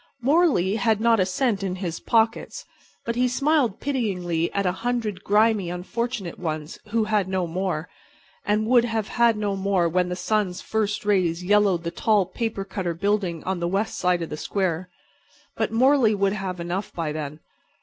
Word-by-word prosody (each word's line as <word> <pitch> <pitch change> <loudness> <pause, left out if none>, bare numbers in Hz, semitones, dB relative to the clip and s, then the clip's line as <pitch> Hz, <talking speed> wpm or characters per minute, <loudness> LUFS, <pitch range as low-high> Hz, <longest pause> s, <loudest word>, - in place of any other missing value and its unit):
Morley 260 - +3
had 220 0 +2
not 230 0 +3
a 185 - +2
cent 205 +1 0
in 190 -2 -2
his 180 -3 -4
pockets; 225 0 0 0.4
but 235 - -2
he 250 +1 +2
smiled 275 -3 +1
pityingly 180 -11 -1
at 200 -1 -1
a 180 - +3
hundred 230 -5 -2
grimy, 210 -3 +3
unfortunate 195 +1 -4
ones 155 -2 -4
who 225 +1 +1
had 210 -3 +1
no 190 -1 -1
more, 175 -1 -2 0.6
and 210 +1 +1
who 220 - -3
would 240 -2 +6
have 225 0 +1
no 205 -2 -1
more 190 -3 +1
when 180 +2 +1
the 180 - -2
sun's 200 -2 -1
first 215 -1 -2
rays 180 -4 +1
yellowed 200 -3 +3
the 170 - -3
tall 210 -1 +2
paper 220 0 -3
cutter 190 -3 -3
building 195 -3 -1
on 190 -1 -2
the 170 - -1
west 195 +5 -1
side 180 -2 +1
of 165 - -7
the 150 - -4
square. 180 -1 -2 0.7
But - - -1
Morley 245 -1 +4
would 200 0 +1
have 190 -3 -4
enough 175 +4 -3
by 165 -3 -3
then. 150 0 -5
195 Hz, 180 wpm, -24 LUFS, 180-225 Hz, 0.7 s, would